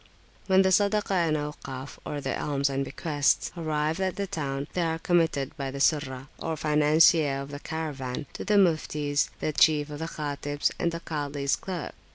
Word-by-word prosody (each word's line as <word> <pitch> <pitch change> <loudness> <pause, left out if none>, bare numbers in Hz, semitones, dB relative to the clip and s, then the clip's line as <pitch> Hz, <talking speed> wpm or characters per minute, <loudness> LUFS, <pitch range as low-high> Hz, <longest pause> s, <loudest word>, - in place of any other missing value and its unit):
When 190 0 +5
the 190 - +3
Sadaka 205 +2 +2
and 170 -5 +2
Aukaf 145 -2 -6 0.2
(the 135 - -2
alms 140 -1 0
and 135 0 0
bequests) 145 +1 0
arrive 155 0 -1
at 190 -1 0
the 200 - -2
town, 140 -7 -3
they 180 - 0
are 165 -1 0
committed 165 -5 +1
by 135 -2 -3
the 140 +1 -6
Surrah, 140 -3 +1
or 165 -1 -2
[p.375]financier 150 -1 +4
of 140 +1 -7
the 145 - -6
caravan, 145 -5 -4
to - - -5
the 210 +2 +1
Muftis, 150 -6 +2
the 155 - -1
chief 150 0 +4
of 145 - -6
the 160 - -3
Khatibs, 145 -2 -2
and 170 - +1
the 170 0 -5
Kazi's 145 -3 -1
clerk. 180 -4 -5
150 Hz, 180 wpm, -27 LUFS, 140-165 Hz, 0.2 s, When